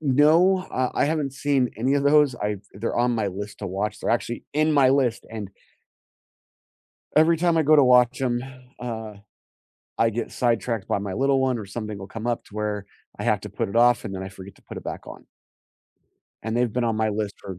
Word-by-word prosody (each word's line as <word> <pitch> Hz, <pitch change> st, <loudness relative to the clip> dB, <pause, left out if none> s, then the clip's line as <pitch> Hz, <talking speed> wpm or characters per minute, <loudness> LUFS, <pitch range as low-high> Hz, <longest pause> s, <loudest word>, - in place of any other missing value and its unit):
no, 155 Hz, +7 st, +4 dB
uh, 130 Hz, -1 st, 0 dB
I -, -, +2 dB
haven't 150 Hz, -3 st, -1 dB
seen 135 Hz, -3 st, +1 dB
any 130 Hz, +5 st, +1 dB
of 140 Hz, -, +1 dB
those. 145 Hz, -2 st, +4 dB
I've 105 Hz, -3 st, -3 dB
they're 110 Hz, +4 st, -3 dB
on 120 Hz, +1 st, +2 dB
my 105 Hz, -3 st, 0 dB
list 100 Hz, +2 st, -7 dB
to 105 Hz, -, -5 dB
watch. 100 Hz, +3 st, -3 dB
They're -, -, -1 dB
actually 120 Hz, 0 st, -1 dB
in 155 Hz, +2 st, +2 dB
my 135 Hz, -3 st, +5 dB
list, 130 Hz, -4 st, +1 dB
and 110 Hz, -3 st, -6 dB, 1.7 s
every 160 Hz, +2 st, +5 dB
time 170 Hz, 0 st, +2 dB
I 160 Hz, -, +4 dB
go 155 Hz, +1 st, +5 dB
to 145 Hz, -, +6 dB
watch 125 Hz, 0 st, +4 dB
'em, 120 Hz, -2 st, 0 dB, 0.4 s
uh, 110 Hz, -3 st, -5 dB, 0.8 s
I 115 Hz, -, +3 dB
get 115 Hz, +2 st, -4 dB
sidetracked 115 Hz, -3 st, -1 dB
by -, -, +1 dB
my 100 Hz, -1 st, -4 dB
little 135 Hz, +4 st, +2 dB
one 130 Hz, -2 st, +1 dB
or 105 Hz, -, -6 dB
something 105 Hz, +1 st, -6 dB
will 95 Hz, -1 st, -8 dB
come 115 Hz, +4 st, -6 dB
up 120 Hz, -1 st, -1 dB
to 105 Hz, -, -15 dB
where 105 Hz, -1 st, -2 dB, 0.3 s
I -, -, -3 dB
have -, -, +1 dB
to -, -, -7 dB
put -, -, -3 dB
it 100 Hz, -, -7 dB
off, 120 Hz, -1 st, +4 dB
and 100 Hz, -2 st, -5 dB
then 95 Hz, -, -5 dB
I 95 Hz, -, -6 dB
forget 95 Hz, 0 st, -12 dB
to -, -, -23 dB
put -, -, -9 dB
it -, -, -8 dB
back -, -, -6 dB
on -, -, -11 dB, 1.2 s
and 110 Hz, +2 st, -2 dB
they've 120 Hz, -2 st, +1 dB
been 125 Hz, +1 st, 0 dB
on 115 Hz, -2 st, 0 dB
my 110 Hz, 0 st, +1 dB
list 105 Hz, -1 st, -2 dB
for 95 Hz, -2 st, -8 dB
120 Hz, 220 wpm, -24 LUFS, 105-135 Hz, 1.7 s, to